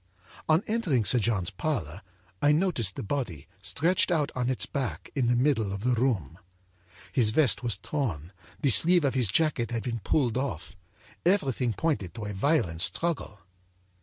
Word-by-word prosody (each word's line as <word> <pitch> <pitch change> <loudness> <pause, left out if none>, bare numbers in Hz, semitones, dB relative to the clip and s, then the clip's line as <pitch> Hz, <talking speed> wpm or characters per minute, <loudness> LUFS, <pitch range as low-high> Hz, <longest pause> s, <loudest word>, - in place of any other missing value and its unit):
âOn 160 +5 +4
entering 180 - 0
Sir 125 - +3
John's 105 -6 0
parlor, 95 - -3 0.4
I 145 - +4
noticed 150 - +1
the - - -5
body, 100 - -4
stretched 170 - +1
out 155 -5 +1
on 125 -1 -1
its 130 - -1
back, 135 -4 -4
in 130 -5 0
the 120 - +3
middle 120 -5 +1
of 100 +1 -5
the 125 0 +2
room. 110 - -1 0.7
âHis 115 -5 +3
vest 135 -1 +3
was 115 -6 -1
torn, 95 - -4 0.3
the 140 -3 +3
sleeve 170 - +5
of 135 - +1
his 125 -4 +2
jacket 135 - +1
had 115 -2 -3
been 115 -2 -3
pulled 125 0 0
off, 90 - -4 0.5
everything 135 - +1
pointed 120 - -2
to, 110 -3 -5
a 105 - -4
violent 95 - +1
struggle. 150 - -1
125 Hz, 165 wpm, -27 LUFS, 100-150 Hz, 0.7 s, sleeve